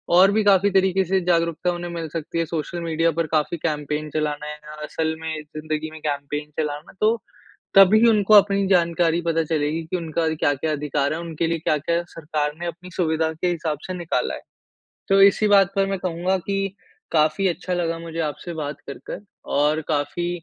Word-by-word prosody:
और 190 +2 +7
भी 215 +1 +2
काफ़ी 200 -1 +5
तरीके 190 0 +3
से 190 +2 +2
जागरूकता 170 0 +1
उन्हें 175 0 -5
मिल 165 -1 -4
सकती 165 0 -3
है, 165 - +1
सोशल 165 +2 -4
मीडिया 165 0 +1
पर 165 0 -1
काफ़ी 155 +2 0
कैंपेन 150 -1 -2
चलाना 150 -1 -1
है 150 - -4
या 150 0 -12
असल 160 +1 -2
में 160 0 -3
ज़िंदगी 155 +1 -5
में 160 - -10
कैंपेन 145 0 -3
चलाना 150 0 -3
है। - - -26
तो 220 +2 +4 0.6
तभी 205 +4 +7
उनको 215 -1 +4
अपनी 200 -1 +5
जानकारी 170 -2 +2
पता 165 0 +2
चलेगी 155 0 -1
की 165 +3 -3
उनका 165 -1 -1
क्या-क्या 145 0 0
अधिकार 145 -1 -1
है, 160 - -4
उनके 165 -1 -2
लिए 165 0 0
क्या-क्या 160 +2 0
सरकार 150 -2 -2
ने 175 - -3
अपनी 175 +2 -7
सुविधा 160 -2 +1
के 160 +3 -2
हिसाब 160 -3 -2
से 185 - -4
निकाला 170 -2 -1
है, - - -7 0.7
तो 195 0 +5
इसी 200 +2 +5
बात 195 -1 +5
पर 195 0 +3
मैं 195 - -1
कहूँगा 180 +1 -1
कि 195 -1 -1 0.4
काफ़ी 155 +4 +3
अच्छा 180 +1 -2
लगा 165 -2 -1
मुझे 165 0 -5
आपसे 160 +4 -8
बात 145 -2 -5
कर 140 - -6
कर - - -5 0.4
और 150 +2 +2
काफ़ी 155 +3 -1
165 Hz, 195 wpm, -23 LUFS, 155-180 Hz, 0.7 s, और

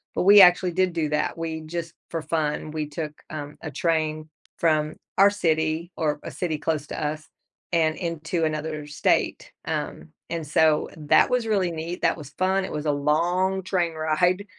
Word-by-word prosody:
but - - +1
we 205 +2 +8
actually 180 0 +6
did 185 0 +1
do 155 -3 -1
that, 150 +2 -1
we 160 -1 -4
just 165 +1 -5 0.2
for 165 -1 -3
fun, 155 -1 -2
we 155 -1 -3
took, 150 0 -5 0.2
um, 150 -1 -6
a 155 - -6
train 155 0 -1 0.3
from 155 -2 +1 0.2
our 195 +1 +7
city, 160 -3 0
or 150 -2 0
a - - -6
city 165 -4 -2
close 150 -1 -2
to 155 - -4
us, 155 +1 -4 0.5
and 160 -2 +2
into 165 -1 -2
another 155 -1 -3
state, 145 - 0
um, 75 +1 -4 0.2
and 165 -2 -3
so 155 +1 +3
that 150 -2 +4
was 250 -2 +1
really 195 -5 +1
neat, 165 +2 -5
that 165 - +2
was 145 -4 -9
fun, 190 +4 +1
it - - -7
was 150 0 -4
a - - +4
long 175 +7 +1
train 175 -3 0
ride, 175 +5 +1
160 Hz, 180 wpm, -25 LUFS, 155-175 Hz, 0.5 s, we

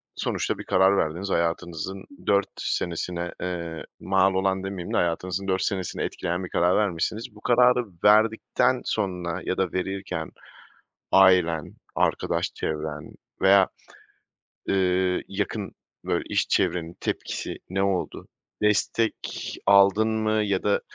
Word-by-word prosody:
sonuçta - - -2
bir - - -7
karar 95 +1 +4
verdiniz, 85 +5 -1
hayatınızın 85 +2 -2 0.2
4 100 0 +3
senesine, 85 0 -2
eee, 85 -3 -4 0.2
mal 95 0 +2
olan 95 0 0
demeyeyim 95 -3 -5
de - - +2
hayatınızın 90 +3 -1
4 95 0 +1
senesini 95 -4 -2
etkileyen 90 +2 -2
bir 90 - -6
karar 90 +2 +2
vermişsiniz. 105 +4 -1
Bu 105 - -15
kararı 125 +1 +4 0.2
verdikten 110 +2 +3
sonra 90 -3 -2
ya 95 - -1
da 95 -2 0
verirken 90 -3 -3 0.8
ailen, 90 -5 +4 0.2
arkadaş - - 0
çevren 75 -1 -4 0.3
veya, 95 0 +6 1.0
ııı, 95 -1 +2
yakın, - - -3 0.3
böyle, - - -1
iş - - 0
çevrenin 85 -1 0
tepkisi - - -3
ne 95 +1 0
oldu? 95 -2 -1 0.4
Destek 105 +2 +2 0.5
aldın 100 +2 +5
mı 110 -1 0
ya 100 -2 0
da 100 -1 +2
95 Hz, 125 wpm, -25 LUFS, 85-100 Hz, 1.0 s, veya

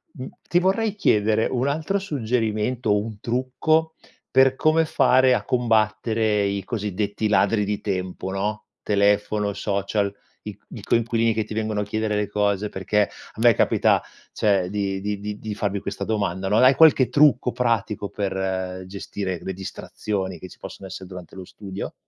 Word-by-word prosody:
mhmm, 130 -3 -6 0.2
ti 175 - +3
vorrei 200 +3 +1
chiedere 110 - +2
un 130 +1 0
altro 160 +7 0
suggerimento, 120 - -1
un 105 0 -5
trucco, 130 +8 0 0.4
per 130 0 +5
come 155 +3 +3
fare 130 -4 +4
a - - 0
combattere 110 -2 +1
i 100 0 -2
cosiddetti 105 0 -2
ladri 105 0 +2
di 105 0 -2
tempo, 95 -1 -3
no, 105 +2 -3 0.2
telefono, 105 0 +1
social, 100 0 -1 0.3
i - - -7
c - - -42
i - - -9
coinquilini 115 -1 +1
che 110 0 0
ti 110 - -8
vengono 110 -1 -1
a - - 0
chiedere 110 +1 -2
le 105 0 -1
cose, 105 0 0
perché 100 +2 +1
a - - -15
me 120 0 +7
capita - - +3 0.3
cioè 95 -4 +1
di 100 -1 -2
di 105 0 -3
di 105 0 -5
di 110 -1 -5
farvi 100 -1 -1
questa 100 - -4
domanda 100 -3 -1
no, 105 +2 +2
hai 130 +2 +6
qualche 150 -5 +6
trucco 145 -4 +4
pratico 110 -4 -1
per 95 -2 -3
gestire 95 -1 -5
le 95 - -4
distrazioni 95 0 -5
che 95 - -9
ci - - -16
possono 95 - -9
essere 95 0 -8
durante 90 -2 -10
lo 95 - -7
studio? 95 0 -7
105 Hz, 165 wpm, -23 LUFS, 100-120 Hz, 0.4 s, me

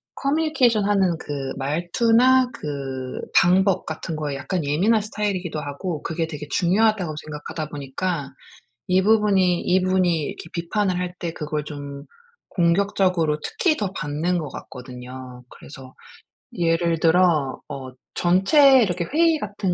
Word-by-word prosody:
커뮤니케이션하는 230 - +2
그 140 -2 -5
말투나 230 - +3
그 135 -3 -5 0.2
방법 190 +2 +4
같은 160 +1 -5
거에 150 -2 -3
약간 175 +3 -3
예민한 195 +10 +2
스타일이기도 200 -6 -3
하고 150 +3 -5
그게 165 0 -2
되게 150 -2 -7
중요하다고 190 -2 +1
생각하다 155 0 -6
보니까 145 +2 -4 0.6
이 185 +1 +3
부분이 195 -4 +3
이 185 +1 +2
분이 185 -1 +2
이렇게 165 - -7
비판을 180 +2 -1
할 180 0 -3
때 170 - -3
그걸 150 -1 -3
좀 140 -1 -8 0.5
공격적으로 175 -3 +1
특히 325 -4 0
더 200 -3 -2
받는 155 +4 -1
것 155 -4 -4
같거든요. 125 0 -10
그래서 135 -2 -13 0.6
예를 165 -1 +1
들어 160 -5 +3
어 130 -1 -7 0.2
전체 260 - +5
이렇게 170 -1 -3
회의 325 - +2
같은 200 -5 -2
175 Hz, 300 characters per minute, -23 LUFS, 150-200 Hz, 0.6 s, 전체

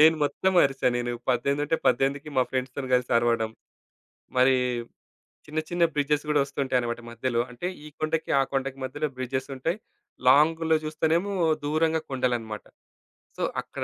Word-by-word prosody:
నేను 160 +1 +7
మొత్తం 190 +5 0
అరిచా 135 -1 0
నేను 120 0 -1 0.2
18 140 +4 +1
ఉంటే 165 +2 +1
18కి 140 +3 +1
మా 130 - +6
ఫ్రెండ్స్‌తోని 130 +1 -3
కలిసి 125 0 +1
అరవడం. 115 -2 +1 0.9
మరి 130 +1 +6 0.9
చిన్న 155 +1 -2
చిన్న 175 -1 +3
బ్రిడ్జెస్ 150 +1 +1
కూడా 145 -1 +4
వస్తుంటాయన్నమాట 125 -4 -1
మధ్యలో. 120 0 -1
అంటే 125 +8 -5 0.2
ఈ - - -7
కొండకి 155 +1 -1 0.2
కొండకి 135 0 -2
మధ్యలో 145 +4 -2
బ్రిడ్జెసుంటాయి. 130 - -2 0.5
లాంగ్‌లో 160 +3 +5
చూస్తేనేమో, 160 +5 0 0.3
దూరంగా 160 +2 +1
కొండలన్నమాట. 120 -5 -2 0.7
సో - - -2 0.2
అక్కడ - - -6
140 Hz, 130 wpm, -26 LUFS, 125-155 Hz, 0.9 s, నేను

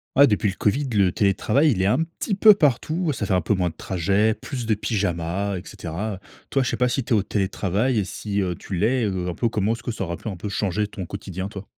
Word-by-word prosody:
Ah 140 +1 +8
depuis 105 -2 +1
le - - -9
Covid, 135 +6 0
le 100 -4 +3
télétravail 105 - +2
il 95 - 0
est 95 - +2
un 125 +10 +3 0.2
petit 205 - -1
peu 215 +2 +8
partout, 155 - +1
ça 110 - -3
fait 95 - -1
un 90 - +3
peu 95 - +1
moins 90 -3 0
de - - -14
trajets, 100 +4 +1
plus 125 +1 -6
de 110 - +3
pyjama 100 -2 -1
et 90 - -5
cetera. 95 +4 -5 0.3
Toi 135 - +2
je 125 - -1
sais - - -1
pas 125 0 +2
si 135 - 0
tu 115 - 0
es - - +5
au 100 - +2
télétravail 100 +4 0
et 100 - +1
si, 100 +1 -3
heu, 90 -1 -1
tu 95 - -7
l'es, 115 +7 +2
heu, 95 -3 -2
un 85 - -5
peu 120 - 0
comment 105 -1 0
est-ce 115 - -5
que - - -3
ça 110 -4 -3
aura 85 -1 -4
pu - - -6
un 95 - -4
peu 100 +4 -5
changer 105 +1 0
ton 95 -3 -7
quotidien, 95 0 -5
toi? 100 -1 -9
105 Hz, 270 wpm, -23 LUFS, 95-115 Hz, 0.3 s, Ah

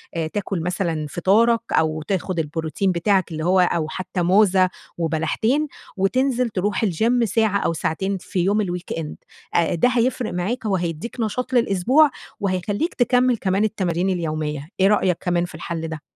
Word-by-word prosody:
آآ 165 -1 -1
تاكل 190 0 -3
مثلًا 170 -3 -1
فطارَك 220 +8 +3
أو 155 0 +1
تاخد 185 +1 -2
البروتين 160 +4 -1
بتاعَك 185 +1 +1
اللي 155 0 -3
هو 185 +1 +4
أو 170 -3 +2
حتى 185 +2 -4
موزة 185 0 +4 0.3
وبلحتين 170 - 0 0.3
وتنزِل 250 +5 +1
تروح 205 +2 -1
الgym 225 +6 +2
ساعة 220 -1 +2
أو 170 - 0
ساعتين 190 +5 -2
في 180 - -4
يوم 200 +4 +2
الweekend 175 -3 -4 0.4
آآ، 170 0 +2
ده 245 +9 +3
هيفرِق 250 -1 0
معاك 215 +7 -2
وهيدِّيك 180 0 -2
نشاط 240 +3 -2
للأسبوع 245 +6 +4 0.3
وهيخلِّيك 200 - -1
تكمّل 250 -1 +2
كمان 195 +1 0
التمارين 185 -4 0
اليومية. 155 -4 -2
إيه 190 - +5
رأيك 190 -4 +2
كمان 175 -1 +1
في 175 - -10
الحل 165 -2 -4
ده؟ 160 -2 -6
185 Hz, 150 wpm, -22 LUFS, 170-220 Hz, 0.4 s, إيه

